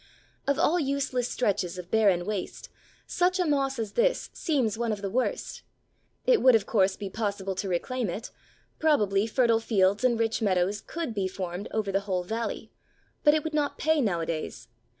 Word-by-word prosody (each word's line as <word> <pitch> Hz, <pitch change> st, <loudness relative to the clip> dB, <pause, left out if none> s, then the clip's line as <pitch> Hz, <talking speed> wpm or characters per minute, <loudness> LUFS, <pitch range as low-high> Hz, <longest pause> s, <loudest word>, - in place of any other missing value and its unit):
Of 280 Hz, -1 st, +2 dB
all 345 Hz, +5 st, +3 dB
useless 270 Hz, -4 st, -1 dB
stretches 195 Hz, -6 st, -1 dB
of 180 Hz, -1 st, -9 dB
barren 195 Hz, -6 st, +3 dB
waste, 205 Hz, -2 st, -4 dB, 0.4 s
such 365 Hz, +1 st, +1 dB
a 360 Hz, -, +2 dB
moss 275 Hz, -3 st, +1 dB
as 220 Hz, -3 st, -3 dB
this -, -, +1 dB
seems 265 Hz, -, 0 dB
one 230 Hz, 0 st, -1 dB
of 205 Hz, -1 st, -4 dB
the 195 Hz, -, -2 dB
worst. 255 Hz, +4 st, -2 dB, 0.6 s
It -, -, +4 dB
would, 255 Hz, -2 st, +7 dB
of 215 Hz, -3 st, +2 dB
course, 190 Hz, -4 st, +2 dB
be 205 Hz, -, -5 dB
possible 200 Hz, -1 st, -3 dB
to 190 Hz, +1 st, -4 dB
reclaim 225 Hz, +6 st, -1 dB
it; 215 Hz, +7 st, -5 dB, 0.5 s
probably, 210 Hz, -10 st, +2 dB
fertile 230 Hz, -1 st, +3 dB
fields 200 Hz, -1 st, +2 dB
and 240 Hz, -3 st, +3 dB
rich 225 Hz, 0 st, 0 dB
meadows 195 Hz, 0 st, +1 dB
could 330 Hz, -8 st, -5 dB
be 195 Hz, -3 st, -1 dB
formed 185 Hz, 0 st, -5 dB
over 215 Hz, -2 st, -1 dB
the 195 Hz, -, +2 dB
whole 180 Hz, -1 st, 0 dB
valley, 225 Hz, +5 st, -4 dB, 0.5 s
but 295 Hz, 0 st, +6 dB
it 310 Hz, -, 0 dB
would 315 Hz, -, -4 dB
not 295 Hz, -1 st, 0 dB
pay 315 Hz, -1 st, +2 dB
nowadays. 165 Hz, -, -2 dB
220 Hz, 180 wpm, -27 LUFS, 195-270 Hz, 0.6 s, would